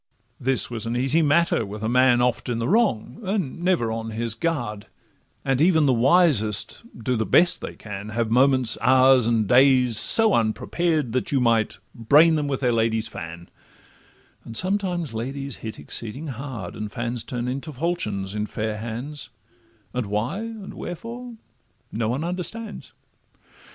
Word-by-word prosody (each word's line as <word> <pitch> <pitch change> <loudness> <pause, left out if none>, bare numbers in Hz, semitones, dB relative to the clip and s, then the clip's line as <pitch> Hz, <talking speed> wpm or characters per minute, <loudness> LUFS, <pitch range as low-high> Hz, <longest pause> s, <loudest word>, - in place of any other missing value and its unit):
This 130 -1 +1
was 115 -1 -3
an 120 +1 -1
easy 135 +6 +2
matter 160 -3 +2
with 105 +1 -7
a - - 0
man 125 0 +4
Oft 125 0 -1
in 120 - -1
the 115 +1 -2
wrong, 210 - +1
and 190 - -3
never 175 -11 +1
on 115 0 -4
his 115 0 -2
guard; 115 -7 -3 0.6
And 135 0 +1
even 160 -2 +4
the 135 - +4
wisest, 125 - +2 0.2
do 120 +2 -1
the 110 - 0
best 175 +9 +3
they - - -6
can, 105 -1 -8
Have 110 0 -2
moments, 130 -1 +3
hours, 130 -1 +5
and 115 -3 +1
days, 125 -2 +5
so 225 -2 +4
unprepared, 145 +5 0
That 130 - -1
you 140 - +2
might 115 -3 +1 0.2
'brain 150 +8 +5
them 150 -2 0
with 135 -1 -2
their 125 -2 +2
lady's 115 -1 +1
fan;' 85 -4 -8 1.0
And 115 - -6
sometimes 185 - 0
ladies 135 +4 -5
hit 110 -1 -7
exceeding 115 - -6
hard, 125 -7 -6
And 105 -1 -5
fans 120 0 -3
turn 120 -1 -4
into 135 +5 -4
falchions 125 - -3
in 105 0 -2
fair 110 0 -3
hands, 120 +4 -6 0.6
And 125 -4 -2
why 105 - -2
and 225 -3 -7
wherefore 235 +7 -7 0.6
no 110 0 -1
one 130 +6 -2
understands. 190 +5 -5
125 Hz, 160 wpm, -23 LUFS, 110-155 Hz, 1.0 s, hours